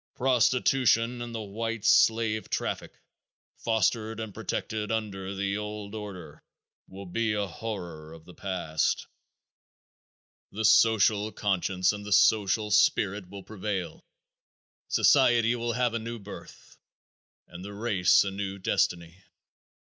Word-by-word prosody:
Prostitution 125 -2 +2
and 120 -1 -6
the 110 - -3
white 115 +2 -4
slave 110 -2 +3
traffic, - - -4 0.6
fostered 110 0 0
and 110 -3 -6
protected 105 +2 -4
under 100 -3 -3
the 100 +1 -1
old 105 -1 -6
order, 100 -6 -8 0.4
will 100 +1 -10
be 110 +4 -1
a 105 -1 -1
horror 85 -5 -7
of 80 0 -13
the 90 - -13
past. 85 -6 -2 1.5
The 110 +2 -2
social 110 0 +4
conscience 95 -2 0
and 105 0 -7
the 105 0 -1
social 105 0 +3
spirit 100 -2 +2
will 100 0 -9
prevail. 100 -4 -5 0.8
Society 120 0 +4
will 120 0 -2
have 120 0 0
a 115 - -1
new 115 +1 -6
birth, 100 -2 -12 0.7
and 90 +1 -10
the 100 +1 -8
race 100 -5 +3
a 100 - -3
new 100 0 -4
destiny. 90 -1 -1
105 Hz, 125 wpm, -27 LUFS, 95-115 Hz, 1.5 s, social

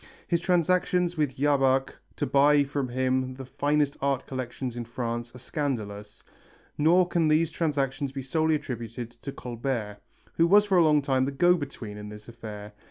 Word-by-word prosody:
His 170 -1 +1
transactions 180 0 +2
with 150 -4 0
Jabach 135 -1 +2 0.2
to - - -1
buy 145 +1 +4
from 140 -1 -2
him 130 +1 -1
the 135 0 -8
finest 145 +2 0
art 140 -2 0
collection 130 0 -4
in 120 - -4
France 120 0 -4
are - - -8
scandalous, 110 -6 -4 0.5
nor 175 +4 +4
can 170 -2 +1
these 155 +1 +3
transactions 140 -4 -1
be 135 -1 -5
solely 160 +4 +1
attributed 120 -3 -5
to 140 - -5
Colbert, 120 -5 -4 0.4
who 165 - +5
was 205 +3 +6
for 190 -3 +3
a - - +6
long 150 -2 +4
time 130 -1 +1
the 140 - -2
go 175 +6 +4
between 135 -10 -5
in 105 0 -8
this 105 0 -11
affair. 105 -3 -9
135 Hz, 170 wpm, -27 LUFS, 120-155 Hz, 0.5 s, was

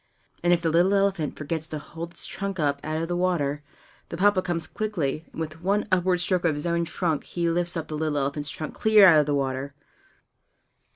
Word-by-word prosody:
And 175 - +2
if 175 -1 +3
the 165 - +2
little 180 +5 +4
elephant 195 -6 0
forgets 160 +1 -3
to 155 - -4
hold 165 +3 -7
up - - -21
its - - -6
trunk 195 -2 -4
out 140 -2 +1
of 155 +2 -2
the 175 - -2
water, 160 -6 0 0.5
the 170 - -5
Papa 200 0 +4
comes 175 -3 -2
quickly, 165 -6 -3
and - - -9
with 160 0 -5
one 200 +4 0
upward 180 -1 +2
stroke 180 0 0
of 165 -3 +2
his 145 - -4
own 170 0 +1
trunk 165 -3 -1
he 170 -1 -2
lifts 175 +1 0
up 160 -1 -4
the 155 - -5
little 155 -1 -1
elephant's 145 +1 -1
trunk 155 +1 -6
clear 215 -2 +6
out 165 -5 +8
of 150 - +2
the 145 - +1
water. 135 0 -2
165 Hz, 220 wpm, -25 LUFS, 150-180 Hz, 0.5 s, out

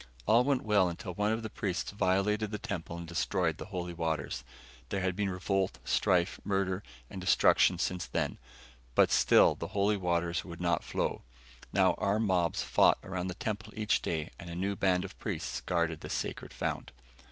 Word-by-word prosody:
All 115 +3 +5
went 135 -1 +1
well 105 -4 +3
until 90 +2 -6
one 105 +4 +1
of 110 +1 -1
the 110 - -4
priests 95 -3 -2
violated 100 +2 +1
the 105 - -3
temple 100 -6 -5
and 85 -1 -7
destroyed 85 -1 0
the - - -5
holy 90 -3 -4
waters. 80 -3 -2 0.5
There 100 - -1
had 95 -1 0
been 100 0 0
revolt, 95 +1 -1
strife, 90 0 +2
murder 95 -1 0 0.3
and 95 - -8
destruction 90 - +4
since 90 -1 -2
then. - - -2 0.6
But - - +5
still - - +6
the - - -6
holy 100 +1 +3
waters 85 -2 0
would 85 -2 -9
not 85 -1 +1
flow. - - -2 0.5
Now - - +4
armed 105 +3 +1
mobs 90 -4 +1
fought - - +4
around 95 -1 -3
the 90 - -4
temple 110 +1 -4
each 105 -5 +1
day 80 -2 -2
and 85 - -8
a 85 - -6
new 100 +3 -1
band 95 -1 +2
of 100 - -11
priests 95 -8 -3
guarded 85 -3 -1
the - - -7
sacred - - -4
fount. - - -3
95 Hz, 185 wpm, -31 LUFS, 85-100 Hz, 0.6 s, still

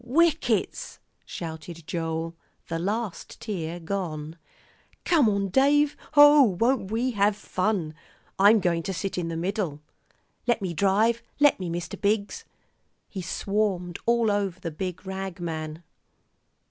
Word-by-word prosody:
"Whickets!" 330 - +1 0.3
shouted 165 0 -7
Joel, 165 0 -3 0.3
the 165 0 -2
last 205 +2 -3
tear 175 -5 -4
gone. 165 -4 -4 0.7
"Come 305 -10 +4
on, 200 -1 0
Dave. 285 +6 +3 0.2
Oh, 290 0 +9 0.2
won't 235 -4 +2
we 235 +4 0
have 205 -2 +2
fun! 185 -5 -1 0.5
I'm 205 +2 +6
going 170 -2 +1
to 190 +3 -4
sit 185 +2 -3
in 170 - -2
the 165 -1 -3
middle. 180 -4 -2 0.7
Let 240 -2 +3
me 185 -4 -3
drive. 210 +7 +2 0.2
Let 290 -6 +5
me, 180 -2 -3
Mr. 170 +1 -5
Biggs." 205 0 0 0.6
He 190 - -5
swarmed 185 -1 -1
all 235 -2 +3
over 200 -3 -1
the 170 -2 -5
big 180 +4 -5
rag 190 -1 -5
man. 160 -1 -5
195 Hz, 135 wpm, -26 LUFS, 170-220 Hz, 0.7 s, Oh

